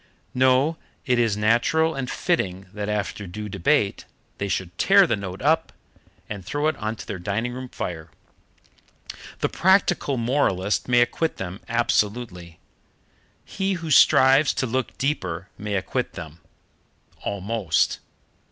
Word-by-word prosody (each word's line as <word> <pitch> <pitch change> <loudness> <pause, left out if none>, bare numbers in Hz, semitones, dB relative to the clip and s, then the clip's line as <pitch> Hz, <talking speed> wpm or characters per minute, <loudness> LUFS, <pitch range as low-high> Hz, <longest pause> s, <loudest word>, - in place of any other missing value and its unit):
No; 130 +5 +3 0.3
it 125 -3 +2
is 115 -4 +2
natural 120 +10 +2
and 130 -3 -4
fitting 95 - -1
that 105 0 -4
after 105 -1 -3
due 105 +4 -6
debate 100 -3 +1 0.3
they 100 - -1
should 90 -2 -3
tear - - +6
the - - +1
note 95 0 -7
up 160 +2 +2 0.6
and 100 -2 -6
throw 145 +10 -2
it 155 - +1
on 110 +1 -3
to 100 - -9
their 100 -3 -5
dining 105 +7 -2
room 130 0 -7
fire. 80 -7 -5 1.3
The - - +1
practical 175 -7 +2
moralist 115 -6 0
may 120 -1 +4
acquit 160 +6 0
them 95 +1 -6
absolutely. 105 -6 -1 0.9
He 195 0 -2
who 165 -3 -5
strives 135 +1 +6
to - - 0
look 130 +2 -2
deeper 95 - -2
may 105 0 -4
acquit 95 - -2
them 80 0 -9 0.8
almost. 100 -4 0
115 Hz, 135 wpm, -24 LUFS, 95-135 Hz, 1.3 s, tear